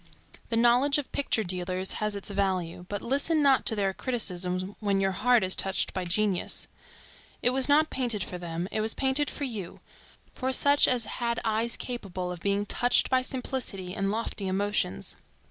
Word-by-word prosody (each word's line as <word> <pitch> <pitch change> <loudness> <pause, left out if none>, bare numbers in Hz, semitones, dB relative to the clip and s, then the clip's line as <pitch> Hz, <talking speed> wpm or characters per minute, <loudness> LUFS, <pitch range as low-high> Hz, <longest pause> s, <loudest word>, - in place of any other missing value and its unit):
The 230 - 0
knowledge 245 +5 +4
of 290 - -4
picture 255 -5 0
dealers 185 0 -1
has 210 -1 0
its 200 0 -7
value, 185 -3 -2
but 205 -1 -4
listen 285 +5 +2
not 275 -2 +4
to 220 - +3
their 195 -2 0
criticism 185 -5 -2
when 200 -2 +1
your 195 0 +1
heart 240 +3 +3
is 185 0 +3
touched 195 0 0
by 185 - -3
genius. 190 +1 0 0.8
It 245 - +4
was 265 +2 +1
not 310 +2 +4
painted 235 -7 0
for 180 0 -6
them, 170 0 -4
it 215 - -1
was 220 +1 0
painted 270 +2 +2
for 290 - -5
you; 220 -10 -5 0.5
for 260 0 -2
such 285 +2 +5
as 245 -3 +1
had 235 -1 -2
eyes 225 +1 +1
capable 190 -7 -5
of 180 - -6
being 200 +3 0
touched 245 +5 +2
by 260 0 +4
simplicity 250 -8 -4
and 195 -1 -1
lofty 210 -2 -2
emotions. 190 - -1
210 Hz, 180 wpm, -28 LUFS, 185-250 Hz, 0.8 s, such